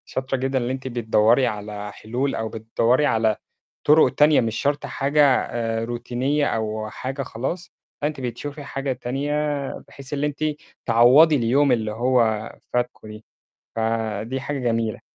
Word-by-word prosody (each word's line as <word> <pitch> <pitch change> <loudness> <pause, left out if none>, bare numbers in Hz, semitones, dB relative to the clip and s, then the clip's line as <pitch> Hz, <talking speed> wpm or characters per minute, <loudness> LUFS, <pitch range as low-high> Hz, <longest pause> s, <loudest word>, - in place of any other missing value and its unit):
شاطرة 130 +1 -2
جدًا 135 +1 -1
اللي 125 0 -1
أنتِ 130 0 -6
بتدوّري 120 +1 +3
على 105 -1 -5
حلول 125 +7 -2
أو 110 0 -3
بتدوّري 115 +5 +1
على 110 -4 +2 0.5
طُرُق 150 +2 +6
تانية 150 0 +5
مش 115 -1 -2
شرط 145 0 0
حاجة 140 +2 +1
آآ، 115 -4 0
روتينية 125 +5 -1
أو 110 -2 -2
حاجة 135 +4 -5
خلاص، 150 +10 -5 0.3
فأنتِ 150 -1 -2
بتشوفي 140 +5 -5
حاجة 135 -1 -3
تانية، 135 +4 -3 0.6
بحيث 140 0 -11
اللي 145 +1 0
أنتِ 150 +1 -5 0.4
تعوّضي 130 +7 +6
اليوم 135 +3 +3
اللي 110 -3 +1
هو 115 -2 +1 0.2
فاتكم 125 -2 -2
دي، 105 0 -11 0.5
فدي 110 +2 -2
حاجة 140 +1 -3
جميلة. 115 -3 -1
125 Hz, 145 wpm, -23 LUFS, 115-140 Hz, 0.6 s, طُرُق